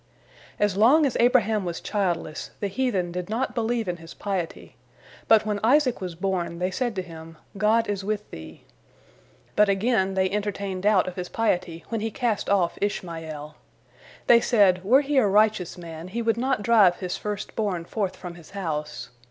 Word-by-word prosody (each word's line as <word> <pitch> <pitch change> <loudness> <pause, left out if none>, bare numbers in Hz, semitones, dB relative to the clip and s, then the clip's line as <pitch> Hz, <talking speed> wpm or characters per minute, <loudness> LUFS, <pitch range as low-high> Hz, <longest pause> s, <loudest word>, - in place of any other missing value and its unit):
As 205 -2 +1
long 270 +9 +6
as 270 - -1
Abraham 225 -4 +3
was 175 -2 -4
childless, 175 -6 -2
the 200 - -2
heathen 195 -5 -1
did 180 +1 -5
not 245 +3 -1
believe 230 -2 -1
in 175 -1 -2
his 165 0 -12
piety, 190 -5 -4 0.5
but 220 -1 +5
when 210 -1 -1
Isaac 255 -1 +3
was 180 -3 -5
born, 175 -2 -2
they 180 +2 -1
said 240 +3 -2
to 185 - -2
him, 165 -2 -11 0.2
"God 220 +3 +2
is 200 -2 -2
with 210 +1 -3
thee." 80 0 -10 0.9
But 210 -1 +4
again 195 -1 +1
they 190 0 +2
entertained 200 -1 -3
doubt 200 -2 +3
of 185 - -6
his 180 -1 -4
piety 175 -7 -1
when 225 -2 -2
he 225 - -1
cast 225 -2 -1
off 190 -4 +1
Ishmael. 160 -6 -4 0.7
They 235 -1 +6
said, 195 -7 +3
"Were 255 +8 +5
he 290 0 -1
a 240 -6 +5
righteous 210 -3 +2
man, 165 -1 -8
he 230 +5 -3
would 225 -1 +2
not 255 -2 -1
drive 205 -6 +5
his 180 -1 -4
first 210 0 -5
born 190 -6 -2
forth 200 0 -2
from 180 -2 -8
his 170 -2 -14
house." 150 -6 -4
200 Hz, 180 wpm, -25 LUFS, 175-225 Hz, 0.9 s, long